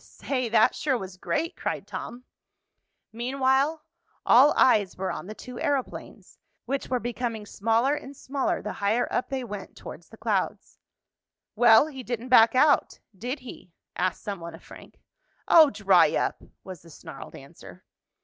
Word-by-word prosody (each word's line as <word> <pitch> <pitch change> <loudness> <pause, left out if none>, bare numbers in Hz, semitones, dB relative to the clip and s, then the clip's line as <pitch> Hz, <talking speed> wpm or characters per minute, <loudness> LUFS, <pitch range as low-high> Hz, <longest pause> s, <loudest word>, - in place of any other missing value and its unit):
"Say, 255 -4 -4
that 220 -1 +4
sure 270 -4 -1
was 190 -3 -8
great!" 325 - -3
cried - - -4
Tom. 245 +1 -8 0.9
Meanwhile, 265 +5 0 0.4
all 265 +5 +6
eyes 210 -7 +3
were 190 0 -2
on - - -7
the 215 - -8
two 250 +2 -10
aeroplanes, 275 -3 -4 0.3
which 275 0 -3
were 255 - 0
becoming 235 -3 -4
smaller 230 +7 +1
and 280 -2 -7
smaller 290 +5 -2
the - - -4
higher 215 +5 0
up - - -1
they 265 -1 -3
went 205 -4 -8
towards - - -11
the - - -15
clouds. - - -3 0.8
"Well, 235 +1 +6
he 280 -4 -8
didn't 245 0 -5
back 230 -1 +6
out; 290 +2 +3 0.2
did 245 +8 -5
he?" 235 -8 -12 0.2
asked 185 0 -2
some 200 -3 -5
one 170 0 -8
of - - -17
Frank. - - -15 0.5
"Oh, 320 -3 +7
dry 190 - +3
up!" - - -1 0.2
was 185 -4 -10
the 165 - -17
snarled 155 - -11
answer. - - -14
245 Hz, 160 wpm, -26 LUFS, 205-270 Hz, 0.9 s, Oh